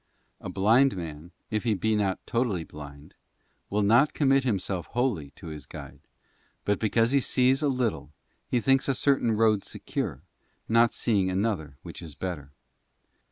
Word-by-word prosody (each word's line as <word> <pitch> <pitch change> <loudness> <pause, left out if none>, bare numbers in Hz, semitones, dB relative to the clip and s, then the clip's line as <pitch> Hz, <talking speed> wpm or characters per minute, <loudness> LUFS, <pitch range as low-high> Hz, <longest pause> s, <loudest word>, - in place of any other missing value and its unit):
<A - - -7
blind 110 +4 +3
man, 80 -1 -7 0.2
if 110 -1 -1
he 115 -3 +1
be 110 +3 0
not 100 -3 +1
totally 115 -8 0
blind, 70 -1 -11 0.6
will 105 +1 +1
not 120 +8 +4
commit 135 -2 +3
himself 95 -7 -1
wholly 120 - -1
to - - -13
his 75 -4 -8
guide, - - -10 0.7
but 105 -1 +1
because 115 +2 +2
he 140 - +4
sees 130 +1 +2
a 150 - +2
little 125 - -1 0.4
he 125 - +1
thinks 135 +2 +2
a 135 - +1
certain 135 -5 +2
road 110 -2 +3
secure, - - -4 0.4
not 115 +1 +4
seeing 100 -6 +1
another 95 -8 -2
which - - -9
is 80 -4 -9
better. 80 -7 -5
110 Hz, 160 wpm, -27 LUFS, 90-125 Hz, 0.7 s, not